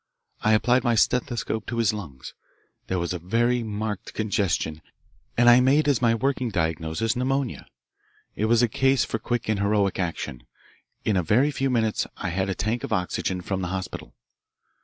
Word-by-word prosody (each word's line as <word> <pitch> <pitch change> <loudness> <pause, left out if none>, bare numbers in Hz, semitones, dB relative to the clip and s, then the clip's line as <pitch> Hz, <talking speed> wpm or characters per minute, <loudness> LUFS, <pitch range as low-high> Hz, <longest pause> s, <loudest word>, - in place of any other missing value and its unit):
I 110 - +3
applied 120 +3 +3
my 120 -1 +2
stethoscope 110 -2 0
to 120 - -4
his 115 -2 +2
lungs. 75 -11 -8 0.5
There 95 - -1
was 85 0 -2
a 90 - -4
very 120 +8 +1
marked 105 -2 -4
congestion, 100 -7 -1 0.6
and 120 +1 +4
I 120 +1 +8
made 140 +4 +3
as 140 -5 +2
my 115 -2 +3
working 130 +1 0
diagnosis 80 +3 -1
pneumonia. 130 0 -1 0.7
It 110 - 0
was 115 +2 +4
a - - +4
case 135 +2 +2
for 115 - -3
quick 120 +2 -2
and 110 -2 0
heroic 100 -2 +1
action. 85 -8 -4 0.6
In 105 -3 +2
a - - +3
very 120 - +3
few 135 -1 -1
minutes 110 -4 0
I 95 - -3
had 95 +3 -1
a 95 - -1
tank 110 +3 -2
of - - -5
oxygen 90 0 -1
from 95 +1 -3
the 90 - -2
hospital. 95 +1 -6
110 Hz, 180 wpm, -25 LUFS, 95-120 Hz, 0.7 s, I